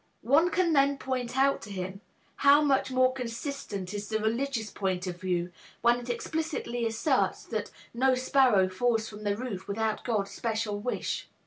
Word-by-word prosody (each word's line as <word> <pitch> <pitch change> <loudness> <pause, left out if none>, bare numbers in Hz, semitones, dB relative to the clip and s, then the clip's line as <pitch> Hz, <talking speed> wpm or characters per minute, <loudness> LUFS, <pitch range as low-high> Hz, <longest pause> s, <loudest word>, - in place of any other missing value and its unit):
One 300 +8 +5
can 360 -3 +2
then 280 -1 +4
point 255 -2 -3
out 275 +1 +3
to 210 - -9
him 190 0 -5 0.4
how 285 +2 +6
much 275 -2 +2
more 255 0 +3
consistent 230 -6 -5
is 205 0 -5
the 220 - +1
religious 225 +1 -1
point 190 -2 -2
of 175 -1 -5
view, 180 -1 -1 0.3
when 240 +1 +4
it 245 0 -9
explicitly 245 -2 -2
asserts 240 +5 +1
that - - -4 0.2
"No 260 +2 +3
sparrow 255 -6 +4
falls 225 +4 0
from 210 0 -9
the 205 0 0
roof 220 -6 -5
without 215 +1 -1
God's 210 -5 -1
special 220 -2 -2
wish." 245 +4 -3
235 Hz, 165 wpm, -29 LUFS, 205-265 Hz, 0.4 s, how